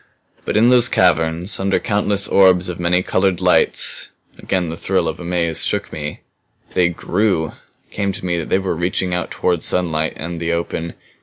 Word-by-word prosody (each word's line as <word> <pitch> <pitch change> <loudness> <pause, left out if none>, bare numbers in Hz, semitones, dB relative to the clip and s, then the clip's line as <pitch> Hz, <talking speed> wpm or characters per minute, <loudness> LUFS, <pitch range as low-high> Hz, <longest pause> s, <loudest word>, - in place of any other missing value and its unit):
"But - - -1
in 115 +3 +5
those 125 -1 +5
caverns, 85 -1 +2
under 95 +1 +1
countless 100 -1 0
orbs 95 -2 +4
of 90 - -6
many 90 +1 +1
colored 95 -2 0
lights" 90 -1 +2 0.3
again 90 -3 -2
the 80 - -5
thrill 95 -1 -1
of 80 +1 -4
amaze 85 -2 -1
shook - - -2
me 75 -1 -6 0.5
"they 90 -1 +3
grew. 90 -1 -1 0.4
It - - -35
came 100 -1 -2
to 90 - -7
me 85 -1 -1
that 80 - -6
they - - +3
were 95 -3 -2
reaching 90 +2 -2
out 90 - -2
toward 90 -3 -1
sunlight 80 -3 +1
and 85 +1 -6
the 85 0 -1
open. 85 0 -4
90 Hz, 180 wpm, -18 LUFS, 85-95 Hz, 0.5 s, in